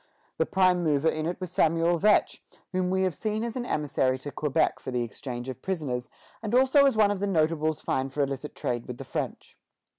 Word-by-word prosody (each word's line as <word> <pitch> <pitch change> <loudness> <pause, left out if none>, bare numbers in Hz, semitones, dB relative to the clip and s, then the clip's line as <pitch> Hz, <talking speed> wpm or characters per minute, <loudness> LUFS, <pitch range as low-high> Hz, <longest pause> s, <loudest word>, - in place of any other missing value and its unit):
The - - +2
prime 185 -2 +3
mover 155 0 +2
in 155 0 -2
it 175 - -3
was 185 -3 -5
Samuel 165 +1 +2
Vetch, 210 +3 +3 0.3
whom 185 -1 0
we 190 0 +1
have 185 -2 +1
seen 215 +7 -2
as 235 -1 -4
an 245 -1 -3
emissary 135 -3 0
to 145 +2 -7
Quebec 150 +2 0
for - - -7
the 125 -1 0
exchange 120 +2 -6
of 130 0 -6
prisoners, 140 -10 -3 0.3
and 220 +1 -1
also 265 +2 +6
as 265 - +1
one 210 -2 +5
of 205 - -2
the 200 - -1
notables 155 -3 +1
fined 130 0 -1
for 145 +1 0
illicit 140 +1 -4
trade 120 -1 -3
with 125 - -6
the - - -8
French. - - -5
160 Hz, 215 wpm, -27 LUFS, 135-190 Hz, 0.3 s, also